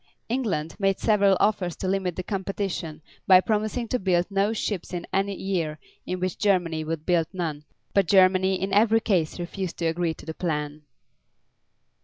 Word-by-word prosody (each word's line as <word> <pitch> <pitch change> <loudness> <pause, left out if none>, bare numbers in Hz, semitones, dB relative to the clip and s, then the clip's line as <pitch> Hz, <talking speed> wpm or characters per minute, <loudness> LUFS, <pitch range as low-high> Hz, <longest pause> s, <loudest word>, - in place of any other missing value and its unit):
England 205 -11 -1
made 195 -1 +2
several 200 -3 +3
offers 195 -4 +1
to 190 - -4
limit 185 -2 -1
the 185 - -4
competition 190 -5 -4 0.2
by 185 -2 +8
promising 215 +4 -1
to 250 - -1
build 180 -2 +2
no 200 +2 +2
ships 205 -5 -3
in 175 -1 -4
any 195 +1 0
year 170 -6 -2 0.3
in 180 0 -2
which 185 -1 -3
Germany 175 -6 +1
would 160 0 -4
build 170 -3 +2
none, 160 -5 -4 0.3
but 195 -3 +3
Germany 190 0 +4
in 195 +1 -2
every 225 +2 +5
case 185 -8 0
refused 175 +1 -4
to 170 - -2
agree 165 0 0
to - - -13
the 160 - -5
plan. 150 -3 -3
185 Hz, 170 wpm, -25 LUFS, 165-200 Hz, 0.3 s, by